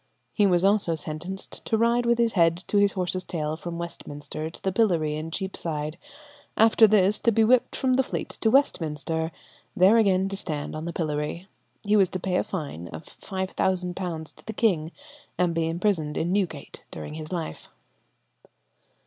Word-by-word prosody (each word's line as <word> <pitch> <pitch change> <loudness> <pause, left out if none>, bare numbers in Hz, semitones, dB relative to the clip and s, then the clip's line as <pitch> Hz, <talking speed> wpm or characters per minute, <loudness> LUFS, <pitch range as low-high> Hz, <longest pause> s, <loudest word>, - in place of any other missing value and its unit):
He 205 -2 +4
was 180 0 +3
also 200 -4 +3
sentenced 165 +5 -6
to 220 - +1
ride 235 +1 +2
with 235 0 +3
his 235 -1 +2
head 165 -3 +4
to 205 - 0
his 200 -1 +3
horse's 185 -1 +1
tail 155 -2 -3
from 170 +1 -6
Westminster 155 -2 -6
to - - -13
the 190 - +1
pillory 175 -8 +2
in 155 +1 -5
Cheapside; 165 -3 -4 0.6
after 225 0 +6
this 210 0 +3
to 230 - +3
be 225 +1 +3
whipped 245 +2 +3
from 260 -1 +1
the 260 - +4
Fleet 260 - -4
to 220 - +3
Westminster, 160 - +1 0.4
there 190 +5 +6
again 195 -3 +3
to 195 - -3
stand 155 -7 -4
on 155 +1 -5
the 170 - -3
pillory. 155 +2 -3 0.4
He 210 +1 +2
was 190 -3 +4
to 185 - -4
pay 180 0 0
a - - +1
fine 145 - -5
of 80 -1 -9 0.2
£5,000 185 -3 -2
to - - -19
the 220 - -4
king, 175 -8 +1 0.5
and 175 -1 +2
be 165 0 0
imprisoned 165 -3 0
in 170 +2 0
Newgate 180 -8 -3
during 150 - -7
his 155 +1 -7
life. 170 -3 -5
180 Hz, 175 wpm, -26 LUFS, 160-205 Hz, 0.6 s, after